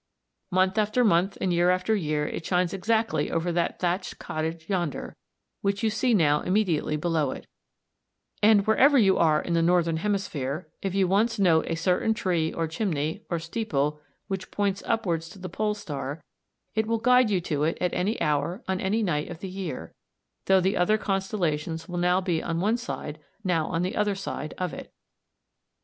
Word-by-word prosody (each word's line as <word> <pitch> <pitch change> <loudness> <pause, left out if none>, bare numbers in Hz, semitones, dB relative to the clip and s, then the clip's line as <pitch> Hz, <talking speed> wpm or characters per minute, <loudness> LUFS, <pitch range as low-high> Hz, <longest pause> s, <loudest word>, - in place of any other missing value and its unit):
Month 185 +2 +2
after 215 +4 +2
month 195 -2 +2
and 180 - 0
year 175 +1 +3
after 185 +4 +2
year 150 -6 -1
it - - -5
shines 180 0 +1
exactly 200 -4 0
over 170 +1 -1
that 170 0 0
thatched 180 +1 -1
cottage 160 +1 -4
yonder, 175 -6 -2 0.5
which 200 +1 -1
you 220 - +2
see 245 +4 +1
now 150 -5 +3
immediately 180 -6 +1
below 155 -3 0
it; - - -7 1.0
and 210 -1 +5
wherever 275 +6 +5
you 195 -6 +4
are 155 -2 +4
in 170 - -3
the 165 - +3
northern 170 -1 +2
hemisphere, 160 -8 -2
if 195 -1 -2
you 195 -2 +3
once 220 +5 +2
note 170 -5 +3
a 165 - -1
certain 180 +6 +1
tree, 170 -6 0
or 165 - -2
chimney, 160 0 -2
or 170 - 0
steeple 155 -5 -2 0.3
which 190 -1 -4
points 200 -1 -1
upwards 175 -8 0
to 185 - -13
the 185 -1 -7
Pole 210 +4 -1
star, 145 -5 -5 0.5
it 220 0 0
will 230 0 +1
guide 250 +1 +4
you 195 -3 +2
to 150 -4 -2
it 160 - 0
at 180 - 0
any 200 +6 0
hour 150 - 0
on 190 0 -1
any 215 +4 +1
night 150 -6 -1
of 175 - -6
the 190 +3 -7
year, 185 -7 -6 0.5
though 190 0 +5
the 190 +2 +1
other 195 +5 +3
constellations 175 -6 -2
will 175 - -5 0.3
be 175 -3 0
now - - -7
on 165 0 0
one 210 +6 +2
side, 155 -10 -6 0.2
now 170 -5 +1
on 165 +1 -1
the 185 - -2
other 210 -1 +1
side 190 -5 -5
of 180 -2 -2
it. - - -9
180 Hz, 185 wpm, -26 LUFS, 165-205 Hz, 1.0 s, and